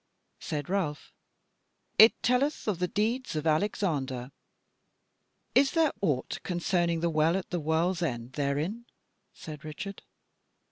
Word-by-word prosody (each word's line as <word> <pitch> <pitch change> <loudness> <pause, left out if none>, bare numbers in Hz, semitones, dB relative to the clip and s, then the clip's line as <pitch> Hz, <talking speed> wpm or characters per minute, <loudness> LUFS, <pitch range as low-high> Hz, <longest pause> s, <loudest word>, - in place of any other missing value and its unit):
Said 145 -2 -4
Ralph: 175 -6 -2 0.9
"It 220 +1 +7
telleth 260 +4 +1
of 195 -5 0
the 180 - +1
deeds 225 +4 -1
of 155 0 -2
Alexander." 155 - 0 1.2
"Is 270 0 +4
there 325 -3 +3
aught 145 -9 -1
concerning 175 -2 0
the 170 - +2
Well 160 +3 +3
at 195 +3 -6
the 175 - 0
World's 165 +3 +1
End 125 -6 -3
therein?" 150 - -2 0.4
said 150 -3 -9
Richard. 155 +6 -7
170 Hz, 125 wpm, -29 LUFS, 150-205 Hz, 1.2 s, It